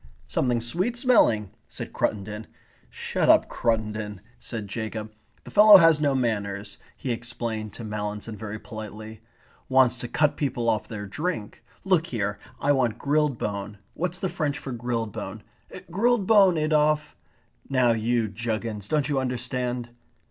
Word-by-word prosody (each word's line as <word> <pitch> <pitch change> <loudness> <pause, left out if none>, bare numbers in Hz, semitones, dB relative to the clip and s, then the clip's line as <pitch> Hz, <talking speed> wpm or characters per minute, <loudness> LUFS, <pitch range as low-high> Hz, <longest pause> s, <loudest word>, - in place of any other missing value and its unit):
"Something 120 -2 +1
sweet 185 - -1
smelling," 120 - +4 0.2
said - - -8
Cruttendon. 105 +2 -2 0.4
"Shut - - -1
up, - - +6
Cruttendon," 105 -3 -1 0.2
said 110 -3 -6
Jacob. 110 0 -5 0.3
"The - - -11
fellow 210 0 +10
has 165 -4 +5
no 140 -2 +2
manners," 105 -5 -2 0.2
he 130 - -3
explained 115 -2 -4
to 115 - -8
Mallinson 105 0 -4
very 110 +1 -6
politely. 110 0 -9 0.5
"Wants 130 -1 +4
to 120 - -4
cut 150 +4 +1
people 125 -5 -1
off 110 - 0
their 105 -2 -6
drink. 115 - -4 0.2
Look 180 -4 +2
here. 105 -3 -2 0.2
I 145 - +2
want 125 -5 +1
grilled 145 -1 +1
bone. 100 0 -4 0.2
What's 180 +1 -2
the 190 - -2
French 155 -5 -2
for 135 - -6
grilled 115 -2 -2
bone? - - -7 0.5
Grilled 225 +3 +2
bone, 195 -5 +6
Adolphe. 150 -1 +2 0.6
Now 130 -3 +3
you 115 0 +1
juggins, 110 -1 -4
don't 150 +3 +1
you 145 -2 +1
understand?" 125 -1 -2
120 Hz, 145 wpm, -26 LUFS, 110-150 Hz, 0.6 s, fellow